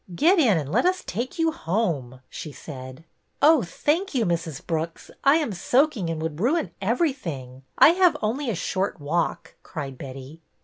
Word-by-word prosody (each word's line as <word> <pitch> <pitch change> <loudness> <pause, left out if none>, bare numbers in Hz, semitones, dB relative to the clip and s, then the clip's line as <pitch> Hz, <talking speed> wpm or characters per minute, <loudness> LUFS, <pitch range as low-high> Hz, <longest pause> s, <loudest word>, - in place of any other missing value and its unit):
'' - - -7
Get 345 - +4
in, 230 - +4
and 145 -2 -3
let 355 - +3
us 370 0 0
take 240 - -4
you 325 -1 +2
home," 165 - -2
she 155 - -7
said. 130 0 -9 0.4
Oh, 305 -1 +6
thank 300 - -1
you, 235 -4 +2
Mrs. 165 -4 -2
Brooks, 165 0 -3
I 275 +2 +6
am 300 -10 0
soaking 245 - +1
and 165 -1 -2
would 160 -1 -4
ruin 295 - +1
everything. 190 - -2 0.2
I - - +9
have 360 0 +4
only 245 +5 -1
a 220 - -1
short 185 +1 -2
walk," 160 +4 -2
cried 135 -4 -7
Betty. 135 +3 -9
185 Hz, 175 wpm, -25 LUFS, -, 0.4 s, I